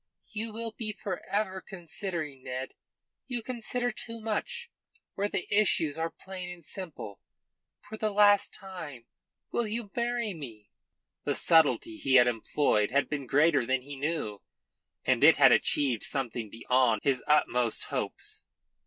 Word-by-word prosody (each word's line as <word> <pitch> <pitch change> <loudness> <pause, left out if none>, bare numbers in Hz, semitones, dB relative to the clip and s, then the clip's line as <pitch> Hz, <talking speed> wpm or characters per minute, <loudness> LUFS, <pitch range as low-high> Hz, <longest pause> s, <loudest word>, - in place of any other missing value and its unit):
"You 220 +1 -3
will 230 +1 -4
be 215 0 -4
for 195 -4 -5
ever 190 -1 -1
considering, 170 -6 -3
Ned. 130 +1 -5 0.5
You 245 -3 -3
consider 245 0 -1
too 230 +1 -7
much, 470 - -3 0.4
where 200 +1 -1
the 180 - -2
issues 165 -7 +2
are 165 +1 0
plain 185 0 -8
and 175 -3 -10
simple. 160 - -6 0.6
For 220 - -9
the 215 0 0
last 205 -1 +5
time 165 - -9 0.5
will 235 - 0
you 215 -1 -4
marry 235 -3 -1
me?" 115 - -10 0.5
The - - 0
subtlety 165 - +4
he 135 - +2
had 125 -1 +8
employed 115 -2 +1
had 140 +3 +1
been 140 -3 -3
greater 145 0 +4
than 130 +1 0
he 140 +1 -7
knew, 140 -8 -2 0.6
and - - +2
it - - +9
had - - +7
achieved 130 -6 +3
something 120 -5 -3
beyond 115 0 +2
his 135 -3 +1
utmost 125 -6 +2
hopes. - - -4
170 Hz, 145 wpm, -29 LUFS, 130-215 Hz, 0.6 s, it